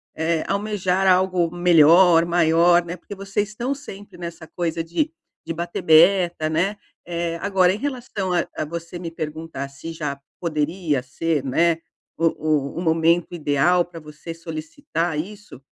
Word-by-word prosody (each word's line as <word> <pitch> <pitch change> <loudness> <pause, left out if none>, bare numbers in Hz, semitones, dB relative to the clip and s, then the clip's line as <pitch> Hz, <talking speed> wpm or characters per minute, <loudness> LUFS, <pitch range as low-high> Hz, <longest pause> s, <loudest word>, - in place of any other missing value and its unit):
eh, 160 0 0
almejar 195 -2 0
algo 185 -2 +3
melhor, 170 0 +6
maior, 170 +1 +4
né. 175 +1 -6
Porque 200 +3 -10
vocês 195 +1 -2
estão 240 +6 -2
sempre 205 -10 -11
nessa 170 -2 -8
coisa 165 -1 -2
de 290 - -1 0.3
de 165 - -4
bater 175 +2 -4
meta, 170 0 +5
né. 190 +6 0 0.3
Eh, 170 -1 -3
agora 190 -2 +3
em - - -3
relação 240 -8 -3
a 175 - +1
a - - -2
você 170 +2 -7
me 170 -2 -5
perguntar 155 -3 -5
se 140 +4 -8
já 150 -4 -4 0.2
poderia 155 -2 -1
ser, 150 +2 -2
né, 165 +5 +2 0.4
o 165 - +1 0.5
o - - -8
o - - -2
momento 165 +1 +2
ideal 165 +3 +2
pra 170 -1 -11
você 150 +2 -9
solicitar 165 - -4
isso, 200 - -8
170 Hz, 155 wpm, -22 LUFS, 160-185 Hz, 0.5 s, melhor